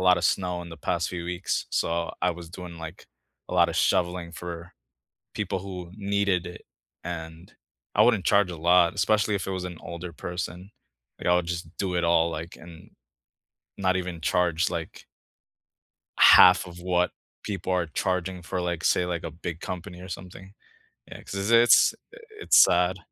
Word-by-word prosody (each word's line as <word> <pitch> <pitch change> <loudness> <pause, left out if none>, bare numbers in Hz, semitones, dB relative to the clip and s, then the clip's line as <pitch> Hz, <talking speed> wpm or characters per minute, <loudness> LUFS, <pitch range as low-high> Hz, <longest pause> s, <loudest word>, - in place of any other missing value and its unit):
lotta 90 -1 +4
snow 90 -2 0
in 85 - -10
the 80 - -9
past 85 +2 -1
few 85 -1 -5
weeks, 90 +1 -2
so, 85 0 -1
I 90 - +3
was 85 -1 -8
doing, 90 -1 -9
like, 80 +2 -9 0.4
a - - -5
lotta - - +4
shoveling 90 -1 0
for 85 0 -8 0.6
people - - -2
who 90 -3 -8
needed 100 -3 0
it 90 - -9 0.4
and 80 0 -7 0.4
I - - +5
wouldn't 115 -6 +3
charge 100 -2 +3
a - - -7
lot, 85 +1 +4
especially 105 -1 +1
if 100 - -2
it - - -3
was 95 -1 -3
an 90 -2 -7
older 85 0 -7
person, 90 +3 -6 0.5
like, - - -7
I 90 - +5
would 90 -1 +1
just 85 -1 -4
do 95 -2 -2
it 85 - 0
all 85 0 +3
like, 80 +2 -7
and 85 -1 -14 0.9
not 95 -2 +1
even 90 -2 -5
charge, 85 +1 +1
like 85 -1 -6 1.1
1/2 90 - +8
of 90 0 -11
what 90 0 +1 0.3
people 95 -3 -3
are 90 -2 +1
charging 90 +3 -2
for, 90 +2 -3
like, 85 -2 -3
say, 90 - +3
like, 85 -2 -3
a - - -4
big 85 +1 -7
company 90 0 -7
or 90 - -10
something. 95 +1 -9 0.6
Yeah, - - -10
'cause 100 +3 -3
it's 115 0 +6 0.2
i - - -13 0.2
it's - - +7
sad. 90 +1 +2
90 Hz, 175 wpm, -26 LUFS, 85-95 Hz, 1.1 s, 1/2